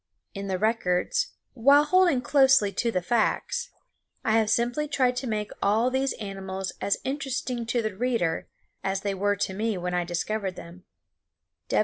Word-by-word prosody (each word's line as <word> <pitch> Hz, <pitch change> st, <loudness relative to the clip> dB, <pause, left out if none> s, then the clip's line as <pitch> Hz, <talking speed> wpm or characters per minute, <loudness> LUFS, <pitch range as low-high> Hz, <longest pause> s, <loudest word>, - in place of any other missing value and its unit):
In 200 Hz, 0 st, -5 dB
the 190 Hz, -1 st, -1 dB
records, 220 Hz, -, 0 dB, 0.2 s
while 280 Hz, +4 st, +5 dB
holding 345 Hz, -4 st, +3 dB
closely 265 Hz, -5 st, +4 dB
to 235 Hz, +5 st, 0 dB
the 180 Hz, -4 st, -1 dB
facts, 240 Hz, -, 0 dB, 0.6 s
I -, -, +2 dB
have 220 Hz, -1 st, +1 dB
simply 240 Hz, +7 st, +1 dB
tried 255 Hz, -4 st, +1 dB
to 255 Hz, +1 st, -3 dB
make 210 Hz, -2 st, -2 dB
all 220 Hz, +5 st, +2 dB
these 265 Hz, +1 st, 0 dB
animals 195 Hz, -2 st, -5 dB
as 200 Hz, -, +1 dB
interesting 260 Hz, -3 st, -3 dB
to 235 Hz, 0 st, 0 dB
the 215 Hz, -3 st, -3 dB
reader 230 Hz, -8 st, 0 dB, 0.4 s
as 195 Hz, 0 st, -1 dB
they 200 Hz, 0 st, -1 dB
were 205 Hz, +1 st, +1 dB
to 195 Hz, -1 st, -2 dB
me 215 Hz, +1 st, -1 dB
when 180 Hz, 0 st, -3 dB
I 180 Hz, 0 st, +1 dB
discovered 185 Hz, +3 st, -2 dB
them. 175 Hz, +2 st, -11 dB
220 Hz, 160 wpm, -26 LUFS, 195-255 Hz, 0.6 s, while